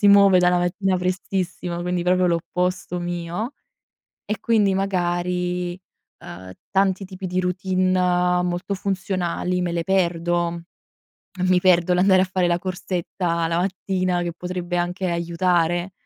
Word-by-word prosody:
si 205 Hz, -, +5 dB
muove 200 Hz, -2 st, +7 dB
dalla 180 Hz, 0 st, +4 dB
mattina 185 Hz, +2 st, 0 dB
prestissimo 180 Hz, -1 st, -2 dB
quindi 180 Hz, 0 st, -1 dB
proprio 180 Hz, +1 st, +3 dB
l'opposto 180 Hz, +1 st, -1 dB
mio, 175 Hz, +7 st, -4 dB, 0.7 s
e 210 Hz, -1 st, -3 dB
quindi 215 Hz, -4 st, +2 dB
magari, 180 Hz, -1 st, -1 dB, 0.4 s
uhm, 95 Hz, +1 st, -10 dB, 0.2 s
tanti 195 Hz, 0 st, +2 dB
tipi 185 Hz, 0 st, -7 dB
di 180 Hz, +1 st, -1 dB
routine 180 Hz, -1 st, +1 dB
molto 180 Hz, +3 st, -2 dB
funzionali 185 Hz, -2 st, -2 dB
me 175 Hz, -1 st, -1 dB
le 170 Hz, -, -1 dB
perdo: 175 Hz, -2 st, 0 dB, 0.9 s
mi 185 Hz, -, +5 dB
perdo 180 Hz, -1 st, +4 dB
l'andare 185 Hz, +1 st, +5 dB
a -, -, +3 dB
fare 185 Hz, -1 st, +1 dB
la 175 Hz, -, +2 dB
corsetta 175 Hz, -2 st, -2 dB
la 165 Hz, -, 0 dB
mattina 185 Hz, -1 st, -1 dB
che 170 Hz, -1 st, -3 dB
potrebbe 180 Hz, 0 st, -4 dB
anche 180 Hz, +2 st, -1 dB
aiutare, 170 Hz, +1 st, 0 dB
180 Hz, 130 wpm, -22 LUFS, 175-185 Hz, 0.9 s, muove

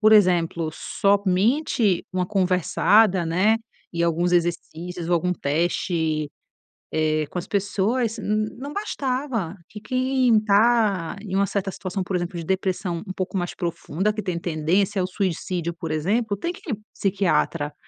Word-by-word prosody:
por 215 Hz, 0 st, +6 dB
exemplo, 170 Hz, -5 st, +3 dB
somente 200 Hz, -, +1 dB
uma 185 Hz, -1 st, 0 dB
conversada, 185 Hz, 0 st, +3 dB
né, 185 Hz, +7 st, +3 dB, 0.4 s
e 170 Hz, -1 st, -1 dB
alguns 170 Hz, +1 st, +1 dB
exercícios 175 Hz, 0 st, -1 dB
ou 175 Hz, -, +3 dB
algum 180 Hz, +2 st, +1 dB
teste, 160 Hz, -1 st, 0 dB, 0.6 s
eh, 155 Hz, -1 st, +1 dB
com -, -, -4 dB
as -, -, -10 dB
pessoas, 215 Hz, +4 st, 0 dB
n 215 Hz, 0 st, 0 dB
não 280 Hz, +4 st, -7 dB
bastava 260 Hz, -, -2 dB
que 210 Hz, -, -10 dB
quem 255 Hz, 0 st, +2 dB
tá 210 Hz, -4 st, +3 dB
em 200 Hz, -2 st, -6 dB
uma 195 Hz, +1 st, +3 dB
certa 195 Hz, 0 st, -2 dB
situação, 185 Hz, 0 st, -4 dB
por 190 Hz, -, -4 dB
exemplo, 175 Hz, 0 st, -3 dB
de 165 Hz, -, -5 dB
depressão 185 Hz, -1 st, -1 dB
um 185 Hz, -, -4 dB
pouco 185 Hz, +1 st, -3 dB
mais 175 Hz, -1 st, -1 dB
profunda, 175 Hz, +3 st, -2 dB
que 215 Hz, 0 st, -4 dB
tem 180 Hz, -3 st, -2 dB
tendência 175 Hz, +5 st, 0 dB
ao 180 Hz, -, 0 dB
suicídio, 180 Hz, -2 st, -2 dB
por 165 Hz, -1 st, -6 dB
exemplo, 200 Hz, +7 st, 0 dB
tem 340 Hz, -, -3 dB
que 345 Hz, -, -10 dB
ir -, -, 0 dB
num 205 Hz, -, -12 dB
psiquiatra. 180 Hz, -6 st, 0 dB
185 Hz, 155 wpm, -24 LUFS, 170-215 Hz, 0.6 s, por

